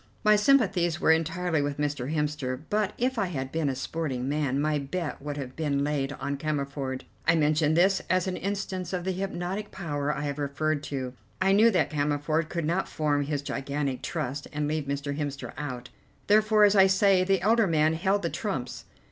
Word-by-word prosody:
My 215 0 +6
sympathies 200 -8 +3
were - - +4
entirely 165 0 +1
with 145 0 -2
Mr. 145 -2 -2
Hemster, 150 -4 -2
but 210 -1 +1
if 250 0 0
I 200 - +1
had 135 -6 -4
been 160 -3 0
a 135 - -2
sporting 135 -2 -3
man 140 -2 0
my 150 0 +1
bet 150 +3 -4
would 145 0 -5
have 130 -2 -6
been 145 -3 0
laid 145 -1 -1
on 140 -1 -3
Cammerford. 140 -3 -3 0.2
I 165 - +5
mention 155 0 +2
this 190 +3 +4
as 185 0 +2
an 185 -1 -2
instance 190 -2 -3
of 180 -1 -2
the 190 - -1
hypnotic 190 +2 -3
power 150 -5 -2
I 150 - -3
have 145 0 -3
referred 145 +1 -1
to. 130 -3 -4 0.3
I 190 0 +3
knew 215 +4 +6
that 170 -9 +1
Cammerford 150 +2 0
could 170 -2 -2
not 175 +5 0
form 145 -2 0
his 145 -1 -2
gigantic 140 -1 -3
trust 145 -3 -3
and 150 0 -2
leave 155 -1 -1
Mr. 140 0 -3
Hemster 145 -2 -4
out; 130 -3 -5 0.4
therefore, 215 0 +4
as 205 0 +6
I 195 -1 +7
say, 190 -1 +4
the 190 -1 +2
elder 225 +1 +4
man 155 -1 +3
held 195 +4 +1
the 170 - -1
trumps. 135 - -4
155 Hz, 195 wpm, -27 LUFS, 145-185 Hz, 0.4 s, I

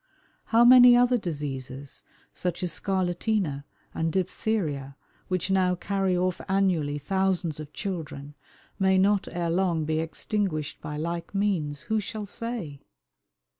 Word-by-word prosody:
How 235 +1 +5
many 245 0 +9
other 245 0 +4
diseases, 140 -6 -5 0.3
such 180 0 -3
as 180 - -1
scarlatina 185 -5 -1 0.3
and 165 0 -1
diphtheria, 175 -7 -2 0.3
which 185 +1 -1
now 185 -1 +3
carry 190 0 0
off 180 0 0
annually 180 -7 +1
thousands 180 -1 -1
of 150 -1 -8
children, 150 -8 -5 0.5
may 190 -1 +4
not 200 +1 +3
ere 170 -1 -1
long 170 -3 +1
be 155 +1 0
extinguished 165 -1 -2
by 150 - -5
like 170 +4 -4
means 165 -8 0
who 220 0 0
shall 210 +1 -5
say? 205 - -5
180 Hz, 130 wpm, -27 LUFS, 155-195 Hz, 0.5 s, many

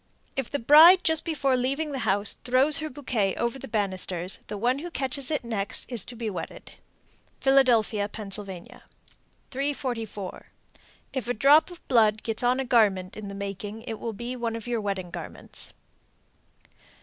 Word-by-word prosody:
If 270 -3 -2
the 285 - -1
bride 315 +9 +8
just 320 -1 +2
before 280 -5 0
leaving 275 +5 -1
the 270 - -3
house 205 -2 +2
throws 265 +4 +4
her 310 +1 -4
bouquet 240 -8 -1
over 235 +3 -2
the - - -8
banisters, 190 -4 -1
the 210 - -5
one 245 +6 +1
who 345 +4 -6
catches 275 -3 -2
it 300 - 0
is - - -11
next 205 -3 -2 0.2
to 245 - -8
be 230 -1 -4
wedded. 200 - -6 0.7
Philadelphia, 235 -6 +3
Pa. 215 0 -7
344. 220 +4 -6 0.7
If 260 -4 -3
a 245 - -1
drop 290 - +5
of 350 -1 -14
blood 220 -3 +3
gets 225 -1 -2
on 250 +1 +2
a 270 - -1
garment 200 -7 +2
in 215 -1 -7
making, 200 +2 -6
it 225 -3 -6
will 230 - -4
be 240 +4 -5
one 235 -2 -3
of 230 - -7
your 240 -2 -1
wedding 195 -3 -3
garments. 170 -3 -6
235 Hz, 160 wpm, -26 LUFS, 205-270 Hz, 0.7 s, bride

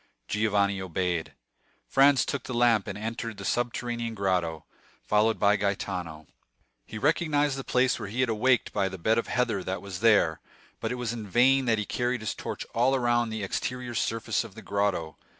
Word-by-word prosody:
Giovanni 100 -2 +1
obeyed. 90 -2 -2 0.5
Franz 135 -1 +5
took 140 -3 -3
the 125 - -4
lamp, 120 -4 +3
and - - -5
entered 115 0 -5
the 100 - -7
subterranean 120 0 -2
grotto, 90 -5 -1 0.4
followed 110 +1 +2
by 105 0 +4
Gaetano. 90 -5 -3 0.6
He - - -7
recognized 145 +1 +1
the 135 - -5
place 125 0 +2
where 100 - -5
he 120 +5 -1
had 130 - +2
awaked 120 +3 +2
by 100 -2 +1
the 95 - -7
bed 110 +6 +2
of - - -3
heather 125 -6 0
that 95 +1 -3
was 95 -3 -6
there; 105 -8 +3 0.4
but 110 - -3
it - - -1
was 120 -2 -3
in 110 -3 -6
vain 130 +6 +4
that 115 -2 +2
he 105 - -2
carried 125 +2 -1
his 110 - -2
torch - - -6
all 130 +3 +3
round 120 -2 +1
the 110 -2 -4
exterior 125 +4 -3
surface 115 0 -1
of 115 -4 -12
the - - -10
grotto. 95 -6 -1
110 Hz, 185 wpm, -27 LUFS, 100-125 Hz, 0.6 s, Franz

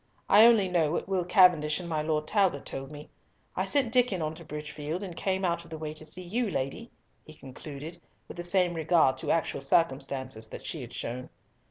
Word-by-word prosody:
I 215 +3 +8
only 220 -5 +4
know 170 -4 +1
what - - -2
Will 190 -2 0
Cavendish 170 -5 +4
and 175 - -7
my 160 -2 -1
Lord 155 0 -1
Talbot 190 -9 +1
told 135 0 -6
me. 150 0 -11 0.4
I - - 0
sent 265 -5 +2
Diccon 245 -7 +3
on 155 -1 -2
to - - -11
Bridgefield, 150 +3 -5
and 180 -4 -7
came 190 +1 -1
out 170 -1 -1
of 170 - -16
the 160 - -6
way 155 -1 -5
to 155 0 -6
see 185 +4 -5
you, 220 +6 -1
lady," 140 - -3 0.3
he 155 - -14
concluded, 150 +4 -9 0.3
with - - -10
the - - -3
same 175 0 +1
regard 160 -4 +3
to - - -5
actual 165 -4 0
circumstances 135 -6 0
that - - -9
she - - -4
had - - -9
shown. 125 +2 -5
165 Hz, 210 wpm, -28 LUFS, 150-185 Hz, 0.4 s, I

